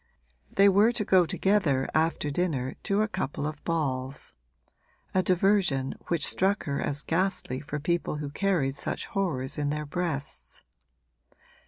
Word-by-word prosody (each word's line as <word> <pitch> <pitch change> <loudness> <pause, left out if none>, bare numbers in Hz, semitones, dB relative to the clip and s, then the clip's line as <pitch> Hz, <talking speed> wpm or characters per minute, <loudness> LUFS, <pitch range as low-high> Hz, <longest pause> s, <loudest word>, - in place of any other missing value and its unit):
They 200 +1 +5
were 200 +4 +5
to 215 -3 -2
go 185 -3 +4
together 165 -9 +2
after 155 -2 +1
dinner 140 -6 -1
to 200 +2 +2
a - - 0
couple 185 -8 -3
of 155 -1 -5
balls; 135 -4 -2 0.8
a 185 - +4
diversion 180 -7 +2
which 170 -4 +1
struck 195 +2 +1
her 140 -1 -2
as 145 +1 -2
ghastly 180 -7 -1
for 145 +1 -5
people 170 +1 -1
who 150 -1 -5
carried 170 -6 +1
such 140 - -4
horrors 150 -10 -2
in 145 -1 0
their 150 +1 -2
breasts. 145 - -4
160 Hz, 145 wpm, -28 LUFS, 140-190 Hz, 0.8 s, They